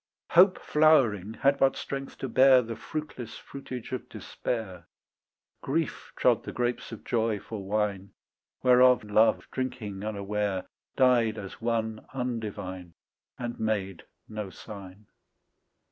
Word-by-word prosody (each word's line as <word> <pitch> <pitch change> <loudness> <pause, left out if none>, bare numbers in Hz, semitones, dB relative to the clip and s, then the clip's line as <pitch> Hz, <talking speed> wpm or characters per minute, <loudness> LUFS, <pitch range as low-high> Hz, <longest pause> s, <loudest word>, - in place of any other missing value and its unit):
Hope 185 +2 +7
flowering 120 - +3
had 140 0 +2
but 135 - +4
strength 135 0 -5
to 135 - -4
bear 130 +1 +6
The 115 0 -5
fruitless 125 0 -6
fruitage 130 -3 -8
of 130 - -5
despair; 95 -8 -5 0.7
Grief 155 +2 -2
trod - - +3
the - - -6
grapes 120 0 -2
of 115 - -8
joy 110 -3 0
for 105 0 -7
wine, 100 -1 -1 0.5
Whereof 125 -1 +6
love 105 +2 +3
drinking 120 -7 -4
unaware 105 -2 -2 0.3
Died 120 -4 +4
as 100 +1 -8
one 110 -1 -1
undivine 105 -8 -4 0.4
And 120 -1 -5
made 100 -5 -1 0.3
no 105 -2 -5
sign. 100 +2 -11
115 Hz, 120 wpm, -28 LUFS, 105-125 Hz, 0.7 s, Hope